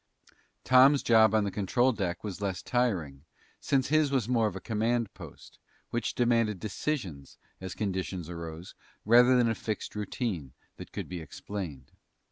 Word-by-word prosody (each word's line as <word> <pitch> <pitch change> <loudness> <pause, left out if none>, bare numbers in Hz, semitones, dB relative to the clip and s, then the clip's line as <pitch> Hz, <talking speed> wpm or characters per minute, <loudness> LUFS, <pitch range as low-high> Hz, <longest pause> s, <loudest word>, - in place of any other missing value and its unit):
Tom's 130 +2 +6
job 110 -1 +5
on 110 - +3
the 100 - -2
control 120 +6 +2
deck 95 -7 -3
was 100 -2 -6
less 95 -2 -3
tiring, 90 - -1 0.4
since 135 -2 0
his 155 -1 +3
was 130 -5 0
more 115 -3 +2
of 100 - -5
a - - -4
command 115 +1 -1
post, - - -13 0.3
which 120 -2 -2
demanded 115 -4 +2
decisions, 100 - -4 0.2
as 95 -1 -6
conditions 95 -4 -3
arose, 85 0 -7 0.3
rather 120 +3 +6
than 120 -1 +3
a 115 - +1
fixed 110 -1 -4
routine 100 - -4 0.2
that - - -10
could - - -5
be 90 -2 -6
explained. 80 -3 -7
105 Hz, 155 wpm, -29 LUFS, 90-120 Hz, 0.4 s, Tom's